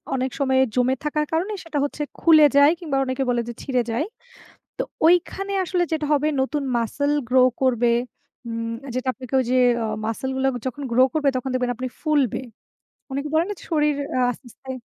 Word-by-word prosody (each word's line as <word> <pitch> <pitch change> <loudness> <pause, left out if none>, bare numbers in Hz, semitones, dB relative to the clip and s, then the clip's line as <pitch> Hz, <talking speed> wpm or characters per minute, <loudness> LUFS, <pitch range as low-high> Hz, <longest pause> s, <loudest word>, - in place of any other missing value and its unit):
অনেক 260 0 -1
সময়ে 265 -1 +3
জমে 255 +1 +2
থাকার 300 0 0
কারণে 365 +7 -1
সেটা 315 -3 -4
হচ্ছে 290 +1 -3 0.2
খুলে 315 -2 +7
যায় 285 +2 +7
কিংবা 300 -6 -2
অনেকে 260 +1 -1
বলে 240 -1 +1
যে - - -5
ছিঁড়ে 255 -3 +1
যায়। 235 +8 0 0.7
তো - - +1 0.2
ঐখানে 370 +3 +2
আসলে 355 0 0
যেটা 310 -2 0
হবে 295 +1 +2
নতুন 285 +2 -1
মাসল 285 +5 -1 0.2
গ্রো 255 0 +4 0.2
করবে, 240 -2 +3 0.6
উম 230 0 -3 0.2
যেটা 255 +1 -2
আপনাকে 260 0 -9
ওই - - -1
যে 255 - +3 0.5
মাসল 225 +4 -3
গুলো 265 0 +1 0.2
যখন 260 +3 -4
গ্রো 255 +2 +5
করবে, 295 -3 +2
তখন 255 +1 -3
দেখবেন 250 -1 0
আপনি 255 0 -4
ফুলবে 290 -6 +1 0.7
অনেকে 280 +2 -3
বলে 320 +1 +4
না - - -2 0.2
শরীর 300 -2 +2 0.3
আস্তে, 245 +2 -6
আস্তে 265 -1 -9
270 Hz, 180 wpm, -23 LUFS, 255-300 Hz, 0.7 s, খুলে